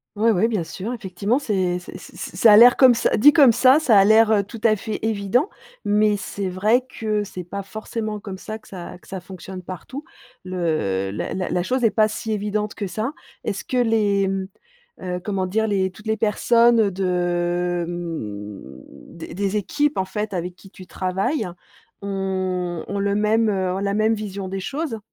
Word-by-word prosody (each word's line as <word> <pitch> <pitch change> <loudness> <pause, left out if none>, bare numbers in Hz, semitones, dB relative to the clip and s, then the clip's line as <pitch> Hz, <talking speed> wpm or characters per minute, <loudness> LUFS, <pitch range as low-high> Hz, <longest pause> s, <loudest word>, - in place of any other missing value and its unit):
Ouais, 225 +2 +3
ouais, 215 +3 +2
bien 215 -7 -1
sûr, 195 +7 -6
effectivement 205 0 -1
c'est 190 -9 0
c'est 180 - -10
c'est - - -14
c'est, - - -6
c 175 - -12
ça 220 +2 +7
a - - +9
l'air 240 +2 +8
comme 255 -3 +7
ça, - - +1
dit 295 +7 +7
comme 285 -6 +7
ça, 260 +5 +5
ça 245 -8 +3
a 195 - +7
l'air, 220 +1 +5
heu, 205 -2 +3
tout 220 +3 -10
à 220 -2 +5
fait 215 +1 -4
évident, 225 - +1 0.4
mais 210 0 +3
c'est 195 -1 -4
vrai 210 +7 +2
que 215 -4 -3
c'est 185 -2 -7
pas 200 +3 -6
forcément 215 +1 -5
comme 195 -2 -8
ça 215 +2 -6
que 220 - -21
ça 180 -1 -8
que - - -22
ça 190 -1 -6
fonctionne 185 0 -9
partout. 185 - -8 0.4
Le, 155 - -1
heu, - - -5
la 105 - -4
la 185 - -2
la 180 - 0
chose 255 +6 -1
est 225 - +4
pas 215 -1 +3
si 220 +1 -5
évidente 210 0 -2
que 200 -3 -4
ça. 220 - -3 0.3
Est-ce 190 -3 -3
que 255 - -3
les, 210 -5 +2
mmh, 190 0 -2 0.6
heu, 180 -1 -3
comment 195 -3 -1
dire 220 +4 0
les, 190 -2 0
toutes 210 +4 -13
les 220 0 0
personnes 230 0 +3
de, 175 -1 -1
mmh, 105 - -8
des 165 - -9
des 200 +1 -1
équipes 290 +8 0
en 190 - 0
fait 210 +1 -4
avec 180 0 -4
qui 195 0 -17
tu 185 -3 -13
travailles 190 +9 -1 0.5
ont 185 -3 -2
ont 200 - -3
le 200 0 0
même, 215 +1 +2
heu, 185 -2 -1
ont - - -2
la 200 0 -1
même 215 +1 +2
vision 200 -2 -5
des 195 +1 -4
choses? 275 - -4
200 Hz, 205 wpm, -22 LUFS, 185-220 Hz, 0.6 s, a